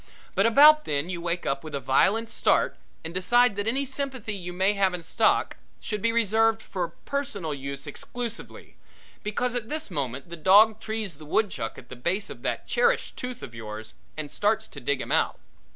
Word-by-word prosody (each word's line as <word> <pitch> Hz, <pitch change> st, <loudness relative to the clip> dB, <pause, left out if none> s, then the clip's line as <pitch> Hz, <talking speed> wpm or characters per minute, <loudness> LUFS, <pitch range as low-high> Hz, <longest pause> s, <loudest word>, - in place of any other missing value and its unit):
But 195 Hz, +3 st, +3 dB
about 300 Hz, +6 st, +7 dB
then 150 Hz, +4 st, -1 dB
you 175 Hz, -2 st, -4 dB
wake 170 Hz, 0 st, -2 dB
up 135 Hz, +1 st, -1 dB
with 155 Hz, -2 st, -6 dB
a -, -, -1 dB
violent 210 Hz, +13 st, +2 dB
start 230 Hz, -, +2 dB, 0.3 s
and 165 Hz, -, -5 dB
decide 240 Hz, +5 st, +3 dB
that 205 Hz, +1 st, -3 dB
any 270 Hz, +5 st, +1 dB
sympathy 265 Hz, -5 st, -4 dB
you 180 Hz, -3 st, -5 dB
may 190 Hz, +3 st, +2 dB
have 195 Hz, -2 st, +2 dB
in 175 Hz, -, -7 dB
stock -, -, +1 dB, 0.2 s
should 210 Hz, -2 st, -4 dB
be 230 Hz, +2 st, +2 dB
reserved 225 Hz, 0 st, +3 dB
for 175 Hz, -6 st, -4 dB
personal 230 Hz, -, -3 dB
use 140 Hz, 0 st, -6 dB
exclusively, 235 Hz, -, -7 dB, 0.4 s
because 235 Hz, +4 st, -1 dB
at 235 Hz, -3 st, -3 dB
this 305 Hz, -8 st, -3 dB
moment 135 Hz, -1 st, -4 dB
the 170 Hz, -, -5 dB
dog 205 Hz, +6 st, +6 dB
trees 215 Hz, -8 st, -4 dB
the 155 Hz, -, -11 dB
woodchuck 155 Hz, -, -1 dB
at -, -, -13 dB
the 125 Hz, -, -8 dB
base 185 Hz, -, -1 dB
of -, -, -10 dB
that -, -, -2 dB
cherished 485 Hz, 0 st, +1 dB
tooth 250 Hz, -1 st, -6 dB
of -, -, -8 dB
yours 110 Hz, -1 st, -7 dB, 0.2 s
and 150 Hz, -2 st, -5 dB
starts 220 Hz, +1 st, +1 dB
to -, -, -9 dB
dig 135 Hz, +2 st, -1 dB
him -, -, -6 dB
out. -, -, +2 dB
200 Hz, 195 wpm, -26 LUFS, 155-230 Hz, 0.4 s, about